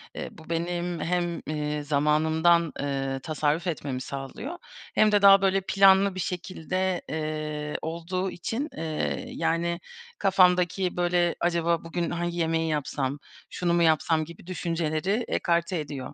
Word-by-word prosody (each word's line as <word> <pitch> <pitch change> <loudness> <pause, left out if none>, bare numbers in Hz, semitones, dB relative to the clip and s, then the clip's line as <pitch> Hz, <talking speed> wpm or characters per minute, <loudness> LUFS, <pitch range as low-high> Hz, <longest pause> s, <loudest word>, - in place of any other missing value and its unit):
Eee, - - -5
bu 160 - -15
benim 175 +1 -2
hem, 175 0 -1
eee, 150 -1 -2
zamanımdan, 155 +3 +3
eee, 135 -1 -2
tasarruf 155 +3 0
etmemi 140 -5 -3
sağlıyor 140 - -6 0.4
hem 215 0 +5
de 205 -1 +4
daha, 195 -1 +8
böyle, 195 0 +2
planlı 195 0 +5
bir - - -4
şekilde, 185 +1 -2
eee, 155 -1 -3
olduğu 170 +3 -3
için, 230 - -3
eee, 160 +8 -2
yani, 170 - -1 0.4
kafamdaki, 180 -1 +3
böyle, 175 -1 +2
acaba 170 -1 +1
bugün 170 0 -2
hangi 175 0 -2
yemeği 165 -1 0
yapsam, 145 -2 -2 0.3
şunu 175 -1 -1
mu 170 - +3
yapsam 160 0 +2
gibi 170 +1 -13
düşünceleri 175 +4 -1
ekarte 170 0 0
ediyor. 145 -3 -6
170 Hz, 135 wpm, -26 LUFS, 155-180 Hz, 0.4 s, daha